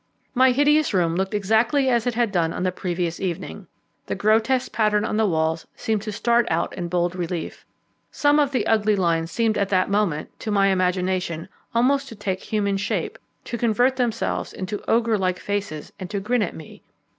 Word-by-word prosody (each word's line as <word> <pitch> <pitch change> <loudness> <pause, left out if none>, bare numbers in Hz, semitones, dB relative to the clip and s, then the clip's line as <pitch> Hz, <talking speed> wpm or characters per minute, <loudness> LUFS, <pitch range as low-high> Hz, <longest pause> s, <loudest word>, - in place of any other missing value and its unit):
My 260 +1 +5
hideous 290 0 +3
room 170 -2 +2
looked 190 +3 -1
exactly 225 +7 +2
as 240 -2 +2
it 245 - 0
had 235 -3 +1
done 165 -3 +1
on - - -3
the 185 - +1
previous 175 -2 -3
evening. 170 - -5 0.4
The - - -2
grotesque 225 +5 +2
pattern 215 -1 +2
on 215 - -2
the 220 -1 +3
walls 160 -2 0
seemed 220 -2 -1
to 215 0 -5
start 235 +3 +2
out 165 +1 -1
in 175 -2 -4
bold 175 0 0
relief. 175 -2 -5 0.4
Some 290 0 +3
of 290 -2 +3
the 260 - 0
ugly 215 -1 +3
lines 165 -3 +1
seemed 225 +2 0
at 200 -1 0
that 185 0 +1
moment, 200 -7 0
to 220 - -5
my 200 -1 +3
imagination, 185 -2 0 0.3
almost 270 +3 +2
to 225 - -9
take 190 -2 -3
human 200 -2 -1
shape, 195 - -2 0.2
to 235 - -5
convert 245 +3 +2
themselves 240 -3 -1
into 190 +2 -5
ogre 225 -2 +2
like 185 -1 0
faces, 200 -7 -4
and 185 -2 -6
to 205 - -2
grin 235 +4 0
at 195 - -2
me. 155 - -12
205 Hz, 190 wpm, -23 LUFS, 180-230 Hz, 0.4 s, My